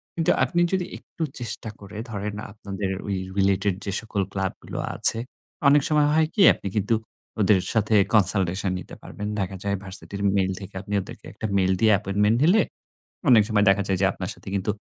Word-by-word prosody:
কিন্তু 165 -2 +2
আপনি 175 -1 +1
যদি 185 -2 +1
একটু 165 - -7 0.2
চেষ্টা 115 -1 -5
করে 100 +1 -11
ধরেন, 105 -1 -4 0.2
আপনাদের 100 -2 -5 0.2
ঐ - - -4 0.3
রিলেটেড 95 0 +2
যে 100 - -2
সকল 110 -2 -3
ক্লাবগুলো 95 -1 -4 0.2
আছে। - - +6 0.5
অনেক 145 +1 +5
সময় 150 -1 +3
হয় 160 0 +3
কি, 210 - +1
আপনি - - -7
কিন্তু 105 +2 +1 0.4
ওদের 100 -1 +4
সাথে 110 -1 +2 0.2
কনসালটেশন 95 -2 +2
নিতে - - -10
পারবেন। 105 - -7
দেখা 95 0 -2
যায় 100 0 0
ভার্সিটির 100 +1 -7
মেইল 95 -1 +1
থেকে 95 0 -10
আপনি 100 +1 -7
ওদেরকে 95 - -11
একটা - - -6
মেইল 95 -1 +2
দিয়ে 110 +1 +4
অ্যাপয়েন্টমেন্ট 105 +3 +1
নিলে, 185 +8 +5 0.7
অনেক 115 -4 +7
সময় 105 -2 +3
দেখা 100 +1 +3
যায় 95 - +1
যে, - - +4
আপনার - - -5
সাথে - - -11
কিন্তু 100 +2 0
100 Hz, 180 wpm, -24 LUFS, 95-110 Hz, 0.7 s, অনেক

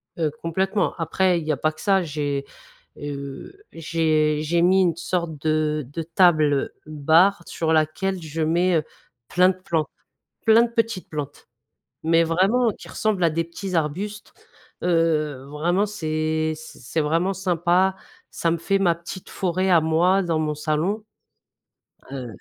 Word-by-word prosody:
heu, 160 -3 0
complètement, 190 +4 0
après 175 +2 +1
il - - -6
n'y 155 - -1
a 145 - 0
pas 155 +4 +1
que 155 - -14
ça 195 -2 +3
j'ai, 145 -3 -3 0.5
heu, 140 - -7 0.2
j'ai 155 -2 +1
j'ai 170 +2 +1
mis 185 +2 +4
une 175 -4 +2
sorte 170 -2 -3
de 155 -1 0
de 165 - -4
table 155 -4 +3
bar, 160 +5 +3
sur 160 -1 -1
laquelle 165 +5 0
je 160 0 -5
mets, 170 +3 +2
heu, 155 - 0 0.4
plein 180 +5 +4
de 185 - -2
plantes, 165 -4 -2 0.6
plein 225 +1 +7
de 240 - +1
petites 230 -4 -1
plantes. 145 -2 -6 0.5
Mais 165 +1 +3
vraiment 195 +9 +2
qui - - -11
ressemblent 210 -5 0
à 165 - +4
des 165 +2 -1
petits 185 +3 -6
arbustes, 190 +7 -3 0.5
heu, 155 -5 +1
vraiment 175 +7 +1
c'est 155 -4 -1
c'est 155 -1 -5
vraiment 165 +6 +1
sympa, 185 0 +2 0.4
ça 170 - -1
me 170 - 0
fait 195 +4 +1
ma 180 -4 +3
petite 170 +2 -9
forêt 185 +1 -1
à 170 -2 +6
moi, 170 +5 +3
dans 170 -3 0
mon 155 -1 -1
salon, 155 +8 -1 1.1
heu 130 -3 -5
165 Hz, 155 wpm, -23 LUFS, 155-185 Hz, 1.1 s, plein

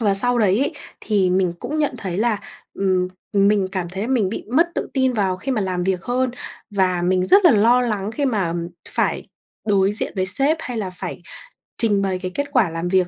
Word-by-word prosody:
Và 205 -3 +2
sau 245 +4 +2
đấy 205 -1 +3
ấy, 280 +4 0 0.3
thì 195 -4 +1
mình 185 -2 +2
cũng 305 +1 -4
nhận 295 -3 +1
thấy 190 -3 -4
là, 225 -2 +1 0.4
ừm, 185 -2 +1 0.2
mình 200 -1 +3
cảm 185 -3 -2
thấy 190 +3 -5
là - - -2
mình 230 -8 +2
bị 215 - -5
mất 335 +5 +4
tự - - -2
tin 260 -2 +2
vào 195 -5 0
khi 270 +7 -3
mà 220 - 0
làm 185 -2 -1
việc 185 -1 -1
hơn. 250 +1 0 0.4
Và 185 -3 +1
mình 185 +1 +1
rất 395 - +5
là 345 - +8
lo 235 +2 +4
lắng 210 -4 -1
khi 285 +5 -2
mà 200 -10 0 0.4
phải - - -1 0.4
đối 195 0 +3
diện 210 - -2
với 185 - 0
sếp 275 +10 +2
hay 250 -5 -5
là 195 -4 -3
phải 180 - -7 0.6
trình 210 -4 +2
bày 190 -2 -1
cái 185 0 -4
kết 285 0 -1
quả 245 -10 +3
làm 165 +2 -3
việc 185 -1 +2
200 Hz, 225 wpm, -21 LUFS, 185-245 Hz, 0.6 s, là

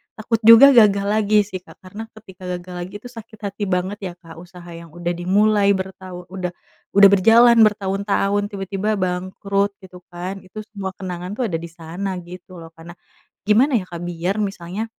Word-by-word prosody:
takut 225 +1 -2
juga 230 +5 +9
gagal 200 -3 +5
lagi 210 0 +3
sih 190 -2 -6
Kak - - -18
karena 205 +4 -8
ketika 190 -4 -15
gagal 180 0 -11
lagi 185 - -13
itu 245 - -10
sakit 225 -2 -12
hati 200 +1 -7
banget 185 +2 -2
ya 180 -2 -5
Kak 165 -1 -14
usaha 175 0 -13
yang 165 -1 -11
udah 175 0 -3
dimulai 200 +3 +2
bertahu 185 -1 -8
udah 180 -2 -4 0.4
udah 200 0 +8
berjalan 230 +5 +6
bertahun-tahun 200 0 0
tiba-tiba 195 +1 -3
bangkrut 190 +2 -2
gitu 180 -1 -13
kan 180 +3 -5
itu 200 +3 -9
semua 195 -3 -5
kenangan 180 -1 -6
tuh 245 +1 -1
ada 165 - -2
di 170 - -8
sana 175 +4 -6
gitu 180 +1 -12
loh 165 - -11
karena, 165 +1 -11 0.5
gimana 245 +7 +4
ya 185 - -8
Kak 170 - -7
biar 175 +3 -3
misalnya, 195 0 -4
190 Hz, 175 wpm, -20 LUFS, 180-210 Hz, 0.5 s, juga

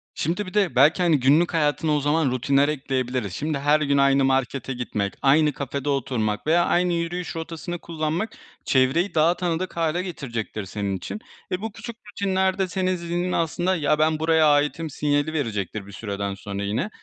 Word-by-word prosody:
Şimdi 175 +7 -1
bir 185 - -9
de, 205 -4 +1
belki, 145 +8 +5
hani, 165 -4 +3
günlük 150 +8 +3
hayatına 155 0 +1
o - - +2
zaman 145 -1 +1
rutinler 135 +3 +2
ekleyebiliriz. 130 -7 -2
Şimdi, 150 - -2
her 145 +2 +3
gün 140 -1 +2
aynı 140 0 +4
markete 135 0 0
gitmek, 105 -5 -3
aynı 150 +2 +4
kafede 140 +1 -4
oturmak 120 -5 -1
veya 170 +2 +4
aynı 175 0 +2
yürüyüş 170 +1 -3
rotasını 165 +1 -5
kullanmak, 165 +6 -2 0.4
çevreyi 135 +9 +2
daha 160 +2 +4
tanıdık 175 0 -2
hâle 165 +2 0
getirecektir 115 - -5
senin 100 0 -3
için. 210 - -6 0.3
E, 185 - -1
bu 225 0 -4
küçük 235 +2 -8 0.2
rutinler 190 -2 0
de 190 -1 +1
senin 185 +1 0
zihninin 175 +1 -2
aslında, 175 +3 0
“Ya 150 -2 +1
ben 155 0 +2
buraya 160 -1 +4
aitim“ 150 +3 0
sinyali 145 +1 0
verecektir 110 - -3
bir 100 - -12
süreden 100 -1 -4
sonra 100 0 -5
yine. 110 - -1
150 Hz, 175 wpm, -24 LUFS, 130-170 Hz, 0.4 s, belki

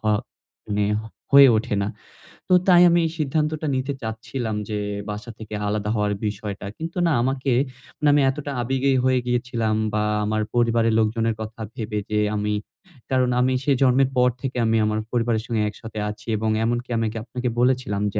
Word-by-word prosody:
হ - - -25 0.6
মানে 105 -1 0 0.5
হয়ে 140 -1 +9
ওঠে 105 -1 -1
না। 100 - -1 0.6
তো 185 - +2
তাই 175 -1 +7
আমি 170 0 +4
এই 160 - -1
সিদ্ধান্তটা 155 +1 -1
নিতে 130 +2 -1
চাচ্ছিলাম 110 0 -4
যে 105 -1 -2 0.3
বাসা 105 +3 -6
থেকে 110 -1 -9
আলাদা 105 0 -1
হওয়ার 105 -1 +1
বিষয়টা। 105 -1 -4
কিন্তু 165 +3 -6
না 165 - +2
আমাকে 130 +1 0 0.5
মানে 150 - 0
আমি 145 - +4
এতটা 145 +1 -4
আবেগেই 135 +2 +1
হয়ে 130 -1 +3
গিয়েছিলাম 120 -3 0 0.2
বা 105 0 +1 0.2
আমার 110 +1 0
পরিবারের 115 -1 +3
লোকজনের 110 +1 +1
কথা 110 +1 -7
ভেবে 105 -2 -3
যে 105 - +1 0.2
আমি 105 0 -1 0.6
কারণ 130 -1 +2
আমি 130 +1 +2
সে 145 - +1
জন্মের 130 0 +4
পর 125 0 +5
থেকে 135 -2 -4
আমি 110 0 +2
আমার 110 0 0
পরিবারের 115 -2 0
সঙ্গে 115 -3 -1
একসাথে 110 0 -8
আছি 105 +1 -9
এবং 110 +1 -1
এমনকি 120 +2 -1
আমি 115 - +1
কি 115 - -6
আপনাকে 125 +1 -3
বলেছিলাম 125 -5 +1
যে 105 - 0
115 Hz, 180 wpm, -23 LUFS, 110-130 Hz, 0.6 s, হয়ে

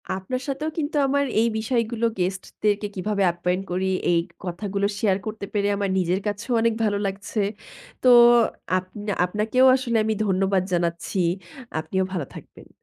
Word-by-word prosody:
আপনার 225 +7 -4
সাথেও 290 +3 -2
কিন্তু 310 -1 -2
আমার 280 +1 +1
এই 230 - +3
বিষয়গুলো, 230 0 -1
গেস্টদেরকে 200 +3 -1
কিভাবে 200 +2 -1
অ্যাপয়েন্ট 180 +2 -1
করি 185 +1 0 0.2
এই 170 - +4 0.2
কথাগুলো 200 +2 -2
শেয়ার 195 -4 +2
করতে 215 -2 -5
পেরে 205 -1 +1
আমার 200 -1 -1
নিজের 180 +1 +1
কাছেও 205 +5 -3
অনেক 230 -1 +2
ভালো 205 -2 +1
লাগছে। 195 +2 -4 0.6
তো - - +2 0.7
আপনা 205 +3 -5
আপনাকেও 215 +7 +2
আসলে 245 -3 0
আমি 220 0 0
ধন্যবাদ 190 -1 +1
জানাচ্ছি। 170 +2 -1 0.6
আপনিও 190 +4 -1
ভালো 170 -6 -2
থাকবেন। - - -13
200 Hz, 145 wpm, -24 LUFS, 185-225 Hz, 0.7 s, এই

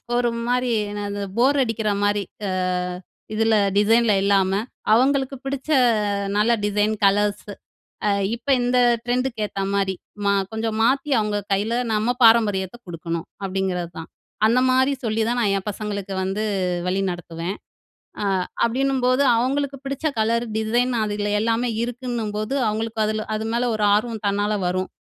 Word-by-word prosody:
ஒரு 240 0 +2 0.2
மாரினா 225 -5 0
இந்த 205 - -4 0.2
போர் 270 +4 +4
அடிக்கிற 225 -2 -1
மாரி 205 0 +1 0.2
அ - - -2 0.8
இதில 225 0 +2 0.2
டிசைன்ல 225 +2 +4
இல்லாம, 195 -1 +3 0.4
அவங்களுக்கு 270 +2 +2
பிடிச்ச 270 +2 -4 0.7
நல்ல 215 +3 +3
டிசைன், 210 +1 +1
கலர்ஸு 205 +1 +1 0.6
அ - - +3 0.2
இப்ப 235 +3 -11
இந்த 245 +1 +1 0.3
ட்ரெண்டுக்கு 245 -2 -1
ஏத்த 195 -1 -4
மாரி 195 -1 +1 0.3
மா 200 - +3 0.2
கொஞ்சம் 220 0 -2
மாத்தி 270 +5 +2
அவங்க 210 -1 -1
கையில 210 +4 0 0.2
நம்ம 220 +3 +1
பாரம்பரியத்த 210 -3 +4
கொடுக்கணும், 170 0 -4 0.2
அப்படிங்கிறது 185 -2 -2
தான். 160 - -8 0.4
அந்த 235 +3 +3
மாரி 260 +2 +3
சொல்லி 220 0 0
தான், 240 +1 0
நான் 205 -4 +2
என் 195 - -10
பசங்களுக்கு 200 -2 -5
வந்து 195 +3 -2 0.4
வழி 190 +2 0
நடத்துவேன். 175 +2 -5 0.7
அ - - -1 0.4
அப்படின்னும்போது, 260 +2 +1
அவங்களுக்கு 275 +3 -1
பிடிச்ச 275 +3 -2
கலர் 230 +2 +1
டிசைன் 240 +3 +1
அது 210 -1 -2 0.3
எல்லாமே 230 +2 +1
இருக்குன்னும்போது 235 -1 -3
அவங்களுக்கு 220 +1 -2
அதில 215 0 -2
அது 215 - -3
மேல 240 +1 +1
ஒரு 210 -1 +1
ஆர்வம் 220 0 -2
தன்னால 205 +1 0
வரும். 185 +1 -1
220 Hz, 140 wpm, -22 LUFS, 205-245 Hz, 0.8 s, போர்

